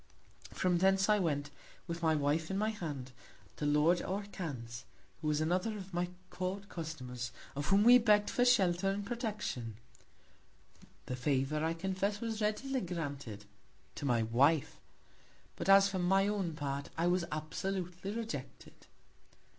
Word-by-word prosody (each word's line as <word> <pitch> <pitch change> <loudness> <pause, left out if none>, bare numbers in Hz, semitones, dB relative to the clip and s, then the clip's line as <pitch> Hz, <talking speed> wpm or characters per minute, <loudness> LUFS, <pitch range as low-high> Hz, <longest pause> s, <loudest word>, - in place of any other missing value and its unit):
From 180 -2 +1
thence 195 +2 +3
I 210 0 +5
went, 145 -5 -1 0.3
with 170 0 -5
my 160 -1 +3
Wife 150 +2 +1
in 190 - -1
my 215 +2 +1
Hand, 150 -11 -5 0.5
to 150 - -1
Lord 150 +4 +4
Orcan's; 150 - -5 0.4
who 155 - -2
was 150 -1 +2
another 180 +7 0
of 190 -1 -9
my 175 0 0 0.2
Court 190 +2 -3
Customers; 125 -7 -5 0.2
of 145 +1 -3
whom 195 +1 +5
we 245 +2 +9
begg'd 210 -3 +4
for 245 - +2
Shelter 195 -7 +4
and 200 +1 -2
Protection: 210 - -3 1.3
The 125 - -3
Favour, 135 +3 0
I 165 +1 0
confess, 195 +3 -1
was 225 -1 -3
readily 255 +5 0
granted 140 - -5 0.5
to - - -6
my 120 -4 +2
Wife; 135 +7 +2 0.8
but - - -3
as 195 0 +8
for 190 -1 -2
my 195 +2 +3
own 195 -5 -1
Part, 140 -2 -3
I 165 - +1
was 175 0 +2
absolutely 180 +4 -3
rejected. 225 +1 -7
175 Hz, 145 wpm, -33 LUFS, 145-200 Hz, 1.3 s, we